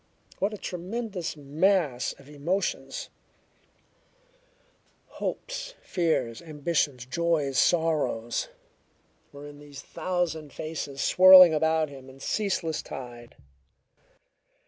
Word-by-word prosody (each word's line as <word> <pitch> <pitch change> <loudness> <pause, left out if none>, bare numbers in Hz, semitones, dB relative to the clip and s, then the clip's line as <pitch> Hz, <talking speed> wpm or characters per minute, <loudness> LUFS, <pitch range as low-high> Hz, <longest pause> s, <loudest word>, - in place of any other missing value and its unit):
What 200 +2 0
a 210 - -6
tremendous 185 -1 -5
mass 150 -2 +1
of 140 - -18
emotions 175 - -3 2.1
hopes, - - -4
fears, 160 -10 -1
ambitions, 150 -5 -1
joys, 145 -1 0
sorrows 155 - +1 0.8
were 145 0 -11
in 145 0 -11
these 145 -1 -11
thousand 165 -5 -3
faces 150 -3 -5
swirling 185 -2 +9
about 160 0 +1
him 135 -2 -12
in 130 +1 -15
ceaseless 180 -2 -1
tide! 120 -2 -9
160 Hz, 90 wpm, -27 LUFS, 140-180 Hz, 2.1 s, swirling